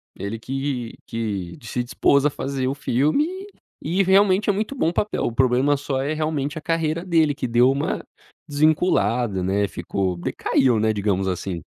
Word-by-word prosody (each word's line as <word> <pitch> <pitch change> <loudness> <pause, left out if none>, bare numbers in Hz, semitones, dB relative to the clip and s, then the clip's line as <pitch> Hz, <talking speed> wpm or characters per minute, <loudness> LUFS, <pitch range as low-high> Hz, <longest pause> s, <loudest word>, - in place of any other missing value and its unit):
Ele 100 +3 -5
que 130 -1 -4
que 100 -6 -4
se 120 +2 -3
dispôs 140 +3 +2
a - - +3
fazer 135 -2 -3
o 135 - -1
filme, 145 - +1 0.5
e 175 +6 +1
realmente 195 +2 +4
é - - +4
muito 215 +7 -3
bom 200 - +1
o - - -6
papel, 210 +4 -1
o - - -1
problema 130 +3 +3
só 135 -1 -2
é 145 +3 -1
realmente 155 -1 -2
a - - -7
carreira 165 +1 -1
dele 160 -5 +2
que 130 -3 -3
deu 120 +2 +4
uma 140 +1 -2 0.4
desvinculada, 125 - +1
né, 100 +2 +1
ficou, 90 0 -3
decaiu, 115 +6 +1
né, 110 0 +2
digamos 100 -2 0
assim. 90 -2 -3
135 Hz, 175 wpm, -22 LUFS, 110-155 Hz, 0.5 s, realmente